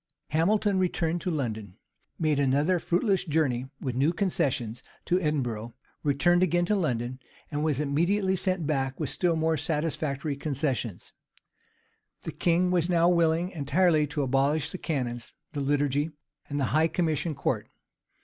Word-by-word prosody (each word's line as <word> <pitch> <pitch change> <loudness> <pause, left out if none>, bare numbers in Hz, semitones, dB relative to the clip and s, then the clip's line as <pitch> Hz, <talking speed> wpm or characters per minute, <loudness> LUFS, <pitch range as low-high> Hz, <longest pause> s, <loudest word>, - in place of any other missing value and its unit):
[] - - -59
Hamilton 195 +5 +2
returned 175 -2 0
to 185 - -2
London; 110 - -3 0.4
made 155 -3 +1
another 145 +6 +2
fruitless 190 +4 +1
journey, 145 -7 0
with 130 - -3
new 135 +6 +2
concessions, 135 - -1 0.2
to 180 +1 +2
Edinburgh; 120 - -2 0.3
returned 175 +5 +3
again 175 -1 +2
to 210 - +1
London; 130 - -1 0.3
and 150 0 -1
was 150 -4 +1
immediately 175 +7 +1
sent 185 -2 -1
back 135 -3 -1
with 150 - -2
still 175 -2 +1
more 160 0 +1
satisfactory 150 -1 -2
concessions. 135 - -3 1.1
The - - -4
king 180 +1 +2
was 175 -1 +1
now 170 -1 +4
willing 170 +1 +2
entirely 155 0 +2
to 145 0 -2
abolish 135 +3 +1
the 185 - -6
canons, 125 -6 -3 0.2
the 145 - -2
liturgy, 145 +1 +1 0.4
and 145 0 -2
the 135 - +2
high 155 +2 +4
commission 160 -2 -1
court. - - -2
155 Hz, 150 wpm, -28 LUFS, 135-175 Hz, 1.1 s, now